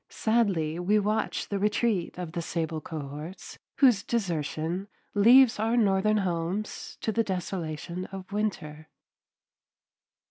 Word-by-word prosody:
Sadly 195 -9 +1
we 200 +4 +2
watch 210 +1 -1
the 200 - -1
retreat 210 -3 0
of 180 -3 -5
the 170 0 -3
sable 160 -1 -3
cohorts, 150 +3 -7 0.2
whose 245 -8 +5
desertion 175 -3 -2 0.3
leaves 235 +3 +6
our 225 +2 +1
northern 215 -1 +3
homes 180 +2 -3
to 220 - 0
the 230 +1 +1
desolation 180 -3 -4
of 190 0 -9
winter. 160 -8 -3
190 Hz, 115 wpm, -28 LUFS, 165-215 Hz, 0.3 s, leaves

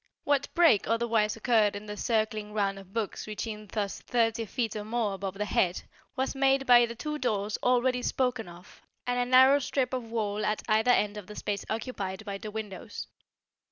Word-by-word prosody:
What 285 -1 +1
break 330 - +5
otherwise 230 -2 +1
occurred 220 -3 +2
in 205 +1 -7
the 210 0 -6
circling 215 -1 -1
round 200 -2 0
of 195 -1 -14
books 220 -1 -3
reaching 215 0 -5
thus 200 -1 -3
thirty 230 -1 0
feet 225 +1 -2
or 210 - -3
more 220 -1 -1
above 195 0 -5
the 210 +1 -2
head 180 -3 +1 0.3
was 265 0 -1
made 270 0 +2
by 240 -1 +7
the 235 - -7
two 300 +5 -4
doors 210 -5 -1
already 250 0 +2
spoken 250 -4 -1
of 175 +3 -15 0.2
and 245 0 0
a 245 - +2
narrow 260 +3 +6
strip 260 -1 -1
of 245 -3 -3
wall 215 -2 -2
at 215 - -1
either 220 +2 +3
end 210 -4 +3
of 205 -3 -8
the 210 - -9
space 205 -2 -3
occupied 215 -3 -4
by 200 -1 -5
the 215 - -6
windows. 210 0 -6
220 Hz, 190 wpm, -29 LUFS, 205-245 Hz, 0.3 s, by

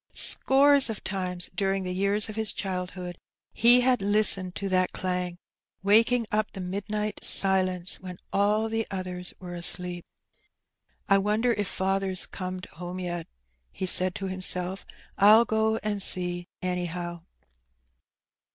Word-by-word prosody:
Scores 280 0 +4
of 220 - -6
times 180 -2 -4
during 195 +1 -2
the 180 0 -4
years 200 +3 0
of 215 - -8
his 220 -1 0
childhood 180 -2 -6 0.4
he 240 +2 +5
had 250 -1 +2
Hstened 195 -2 +3
to 200 - -4
that 185 -1 0
clang, 180 -1 -3 0.5
waking 230 +4 +3
up 215 0 -1
the 195 - -8
midnight 205 +3 -4
silence 185 -2 +2
when 180 -1 -9 0.2
all 210 +2 +1
the 225 0 -3
others 180 -2 -5
were 180 -1 -9
asleep. 175 0 +5 1.0
'^I 195 0 +3
wonder 215 +4 0
if 205 -3 -3
father's 190 -1 -2
comed 185 -1 -7
home 175 +5 -9
yet? 175 -2 -5 0.3
'' 65 - -47
he 190 - -5
said 185 0 +1
to 195 - -5
him 185 0 -6
self; 185 +1 -2 0.3
''I'll 215 +4 +6
go 220 0 0
and 205 -1 -1
see, 175 -2 +4 0.2
anyhow." 175 -1 -4
190 Hz, 140 wpm, -26 LUFS, 180-210 Hz, 1.0 s, I'll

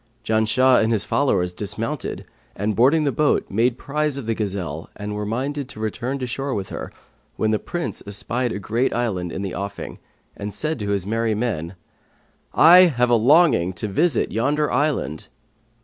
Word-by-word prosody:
Janshah 115 +4 +3
and 110 +1 +1
his 105 -3 +2
followers 95 -11 +1
dismounted 110 +9 -4 0.3
and, 105 +1 -1
boarding 140 +8 +4
the 140 - +1
boat, 150 +2 +1
made 115 +4 +1
prize 150 0 -1
of 140 - -5
the 115 - 0
gazelle 95 -8 -4
and 105 0 -5
were 105 0 -3
minded 135 +4 -3
to - - -10
return 120 +5 -3
to 130 - -3
shore 135 +2 -3
with 95 -2 -4
her, - - -6 0.4
when 110 - 0
the 110 - +1
Prince 175 -1 -4
espied 120 +4 -2
a - - -3
great 115 +6 -1
island 95 -8 -1
in 95 - -4
the 95 - -4
offing 100 +1 -6 0.4
and 100 -1 -6
said 155 +2 -1
to 105 -1 -3
his 100 -2 0
merry 115 +1 0
men, 100 -7 -3 0.8
'I 170 +4 +8 0.2
have 125 0 +3
a - - +5
longing 120 - +4
to 90 +4 -4
visit 150 - +1
yonder 145 +6 0
island.' 140 - -1
115 Hz, 180 wpm, -22 LUFS, 100-135 Hz, 0.8 s, I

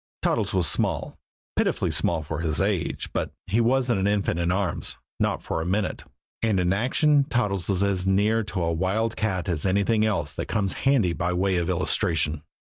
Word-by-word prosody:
Toddles - - +1
was 90 -2 +1
small, - - -1 0.4
pitifully - - +1
small 80 -2 0
for 80 +1 -4
his 80 -2 -1
age; 100 -6 -1
but - - -1 0.2
he 105 +5 +1
wasn't 125 -2 +2
an 95 - +1
infant 100 -4 0
in 85 0 +1
arms 95 -3 -1 0.2
not - - 0
for - - -2
a - - -2
minute. 100 +1 -1 0.4
And 110 -4 +2
in 90 +1 +2
action 140 +7 +3
Toddles 105 - -1
was 100 -1 +1
as 95 -2 0
near 105 +4 +2
to 90 - -2
a 85 0 0
wild 100 +7 0
cat 95 -5 -1
as 85 -5 0
anything 100 +3 +2
else 85 -9 0
that - - -4
comes 100 -2 0 0.2
handy 110 -11 +3
by 90 0 -1
way 95 +1 +1
of 85 -1 -1
illustration. 80 -2 0
95 Hz, 190 wpm, -25 LUFS, 85-110 Hz, 0.4 s, action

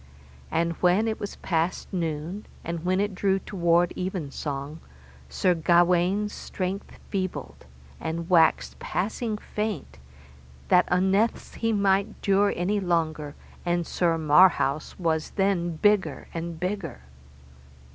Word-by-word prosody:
And 170 +1 +1
then 170 - -7
when 185 +5 +4
it 220 - -2
was 200 - -5
past 170 +2 -2
noon, 165 +3 -3 0.2
and 170 -1 -4
when 185 +1 +1
it 205 0 0
drew 190 +1 +1
toward 175 -3 +1
evensong, 150 -5 -4 0.5
Sir 180 - +2
Gawaine's 175 +4 +3
strength 190 +1 -5
feebled, 185 - -4 0.3
and 165 +1 -4
waxed 165 -3 +3
passing 215 +4 -2
faint 210 - -4 0.7
that 180 -1 +5
unnethes 190 +5 +1
he 225 0 -1
might 200 0 +1
dure 200 +1 +3
any 195 +4 0
longer, 160 -5 -1 0.3
and 175 -1 0
Sir 170 -1 +1
Marhaus 155 -2 +3
was 160 -3 0
then 185 -4 +1
bigger 205 +4 +1
and 165 -1 -5
bigger. 180 - -3
180 Hz, 120 wpm, -26 LUFS, 165-195 Hz, 0.7 s, that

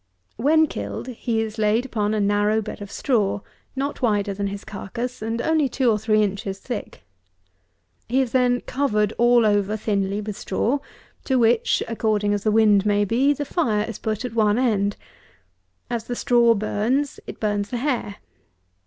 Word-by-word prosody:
When 310 +7 +4
killed 280 - -5
he 230 -2 -2
is 220 -1 -5
laid 215 +3 +2
upon 215 -4 -1
a - - 0
narrow 205 +1 +2
bed 215 -1 -6
of 200 - -8
straw, 210 -6 0 0.3
not 280 +2 -3
wider 205 -4 +1
than 200 +1 -2
his 200 0 -6
carcass, 240 +5 -6
and 225 +1 -2
only 315 -4 +2
two 250 -2 +2
or 210 - +1
three 215 0 +2
inches 195 -1 -3
thick. 245 +4 -7 1.1
He 255 +3 +2
is 260 -3 0
then 250 -1 +2
covered 215 -6 0
all 240 -1 +5
over 205 0 +1
thinly 200 -2 -1
with 210 -1 -5
straw, 235 +10 -1 0.5
to 265 - +1
which, 230 -1 +3
according 215 -2 0
as 205 -1 -2
the 215 - +2
wind 210 -2 +4
may 205 0 +2
be, 250 +7 +2
the 290 0 -2
fire 220 -11 0
is 230 - -6
put 220 +2 -3
at 245 - -5
one 215 -2 +2
end. 205 -5 +1 0.9
As 235 -2 -3
the 245 - -4
straw 235 -1 +4
burns, 225 +7 -1
it - - -8
burns 205 -1 -1
the 245 - -3
hair. 240 -6 -2
220 Hz, 175 wpm, -23 LUFS, 205-245 Hz, 1.1 s, all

